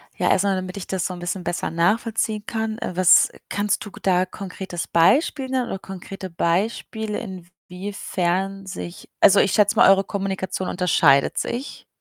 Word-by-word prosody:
Ja, -, -, 0 dB
erst 190 Hz, -, +3 dB
mal, 195 Hz, -, +2 dB
damit 185 Hz, 0 st, -5 dB
ich 195 Hz, -, -7 dB
das 190 Hz, -2 st, -2 dB
so 185 Hz, -, -3 dB
'n 180 Hz, -, -8 dB
bisschen 175 Hz, +1 st, -4 dB
besser 175 Hz, -, -2 dB
nachvollziehen 215 Hz, +5 st, 0 dB
kann, 220 Hz, -1 st, -3 dB
äh, -, -, -4 dB
was 185 Hz, -2 st, +6 dB, 0.2 s
kannst 205 Hz, +2 st, -1 dB
du 205 Hz, -, -9 dB
k -, -, -13 dB
da 185 Hz, -1 st, +2 dB
konkretes 185 Hz, -2 st, -6 dB
Beispiel 265 Hz, -, +2 dB
nennen 255 Hz, -2 st, -1 dB
oder 190 Hz, -, -4 dB
konkrete 190 Hz, 0 st, -8 dB
Beispiele, 210 Hz, +5 st, -1 dB
inwiefern 190 Hz, 0 st, -4 dB
sich 185 Hz, -2 st, -8 dB
Also, 195 Hz, 0 st, +6 dB
ich 200 Hz, -, +3 dB
schätze 205 Hz, -1 st, +3 dB
mal, -, -, +6 dB
eure 195 Hz, 0 st, +5 dB
Kommunikation 190 Hz, -2 st, -3 dB
unterscheidet 165 Hz, -6 st, +3 dB
sich. 250 Hz, +4 st, -4 dB
190 Hz, 170 wpm, -22 LUFS, 180-210 Hz, 0.2 s, was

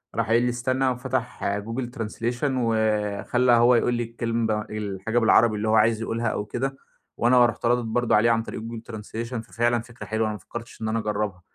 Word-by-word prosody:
راح 115 Hz, -3 st, 0 dB
قايل 115 Hz, +2 st, +3 dB
لي: 125 Hz, -, +2 dB
"استنى." 130 Hz, +2 st, 0 dB
وفَتح 125 Hz, 0 st, -3 dB, 0.2 s
Google 115 Hz, +4 st, -4 dB
translation 115 Hz, +3 st, -3 dB
وخلّى 110 Hz, +1 st, +1 dB
هو 120 Hz, +1 st, +6 dB
يقول 120 Hz, +1 st, +2 dB
لي 120 Hz, 0 st, 0 dB
الكلمة 115 Hz, -2 st, -1 dB
الحاجة 105 Hz, +2 st, -2 dB
بالعربي 115 Hz, -1 st, +4 dB
اللي 105 Hz, +1 st, -2 dB
هو 110 Hz, -, +4 dB
عايز 110 Hz, +1 st, +3 dB
يقولها 115 Hz, +1 st, -2 dB
أو 105 Hz, -1 st, -2 dB
كده، 135 Hz, +5 st, -3 dB, 0.4 s
وأنا 120 Hz, +1 st, +5 dB
رُحت 120 Hz, 0 st, -2 dB
رادد 120 Hz, +1 st, +3 dB
برضه 120 Hz, +2 st, +1 dB
عليه 115 Hz, +2 st, +4 dB
عن 115 Hz, 0 st, +2 dB
طريق 110 Hz, -, -6 dB
Google 115 Hz, 0 st, -6 dB
Translation، 115 Hz, +3 st, -6 dB
ففعلًا 120 Hz, +1 st, 0 dB
فكرة 120 Hz, +1 st, -11 dB
حلوة 110 Hz, +1 st, 0 dB
أنا 110 Hz, -, -2 dB
ما 105 Hz, -, -7 dB
فكّرتش 115 Hz, +7 st, -9 dB
إن 110 Hz, -, -2 dB
أنا 115 Hz, +1 st, 0 dB
أجرّبها. 105 Hz, -3 st, -2 dB
115 Hz, 200 wpm, -25 LUFS, 110-120 Hz, 0.4 s, هو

